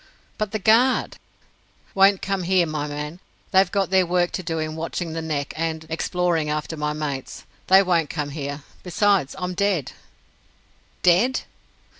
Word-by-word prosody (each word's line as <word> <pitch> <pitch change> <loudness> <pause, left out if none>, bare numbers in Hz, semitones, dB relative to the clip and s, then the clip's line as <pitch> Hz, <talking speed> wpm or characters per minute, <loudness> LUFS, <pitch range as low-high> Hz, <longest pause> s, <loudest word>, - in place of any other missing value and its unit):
"But 215 -2 -1
the 215 - -1
Guard?" 230 +5 +3 0.8
"Won't 195 0 +4
come 195 -1 -1
here, 180 0 +3
my 155 -2 -3
man. 150 +3 -6 0.3
They've 190 -1 +4
got 195 -2 0
their 190 -1 +5
work 175 0 +1
to - - -3
do 165 -2 -3
in 155 0 -3
watching 165 +1 -4
the 165 - -3
Neck 150 -3 -3
and 160 0 -3
exploring 170 -1 0
after 150 +2 -3
my 150 -1 -2
mates. 145 -3 -5 0.2
They 190 +1 +7
won't 170 -5 +1
come 145 -1 -3
here. 140 -1 -5 0.2
Besides, 190 -4 +1
I'm 180 -1 -3
dead." 195 -6 0 1.1
"Dead!" 195 +9 +4
170 Hz, 155 wpm, -23 LUFS, 155-190 Hz, 1.1 s, They